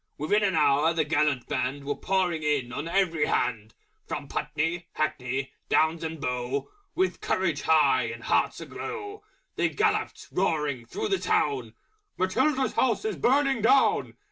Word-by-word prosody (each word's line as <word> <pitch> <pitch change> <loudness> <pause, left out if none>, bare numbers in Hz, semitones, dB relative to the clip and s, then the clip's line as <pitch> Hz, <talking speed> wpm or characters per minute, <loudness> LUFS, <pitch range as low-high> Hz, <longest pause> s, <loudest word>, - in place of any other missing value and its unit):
Within 180 +9 +1
an 195 -3 +1
hour 150 +1 +3
the 160 - +2
Gallant 150 -4 +1
Band 130 +2 -2
Were 145 - 0
pouring 180 -4 0
in 145 -5 0
on 145 +5 -4
every 170 -3 +1
hand, 110 -2 -1 0.3
From - - -5
Putney, 165 +3 -2
Hackney 135 -3 -2 0.2
Downs 160 +1 +2
and 160 0 -4
Bow, 125 +1 -3 0.2
With 375 +1 0
Courage - - 0
high - - +4
and - - -6
Hearts - - +1
a - - -6
glow 415 -2 -6 0.4
They - - +2
galloped, - - -1
roaring 150 -9 -1
through 430 0 -3
the 390 - +1
Town, 420 - 0 0.4
"Matilda's 260 +9 +1
House 260 - +1
is 435 - -1
Burning 270 -1 +2
Down!" 265 +5 +3
160 Hz, 150 wpm, -27 LUFS, 140-210 Hz, 0.4 s, high